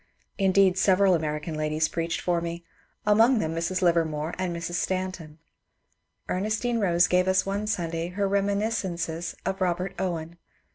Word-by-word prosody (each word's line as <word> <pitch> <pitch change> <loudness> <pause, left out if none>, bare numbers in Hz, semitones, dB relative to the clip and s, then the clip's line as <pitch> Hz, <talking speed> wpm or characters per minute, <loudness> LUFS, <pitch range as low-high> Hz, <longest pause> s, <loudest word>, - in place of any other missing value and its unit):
Indeed, 190 -1 +4
several 190 0 +4
American 155 -1 -2
ladies 155 +1 0
preached 165 +1 -2
for 175 -1 0
me, 170 0 -5 0.2
— - - -39 0.2
among 225 +5 +5
them 160 -6 -1
Mrs. 170 +3 -1
Livermore 165 -2 +1
and 185 -1 -1
Mrs. 170 0 -5
Stanton. 185 -4 -3 0.9
Ernestine 215 +5 -1
Bose 175 -4 +3
gave 180 +1 +2
us 190 0 +3
one 200 +2 -2
Sunday 170 -5 -2
her 200 +3 -1
rem 200 0 +1
iniscences 185 -6 -2
of 190 - -2
Bobert 180 0 -1
Owen. 170 -2 -3
180 Hz, 150 wpm, -26 LUFS, 165-195 Hz, 0.9 s, among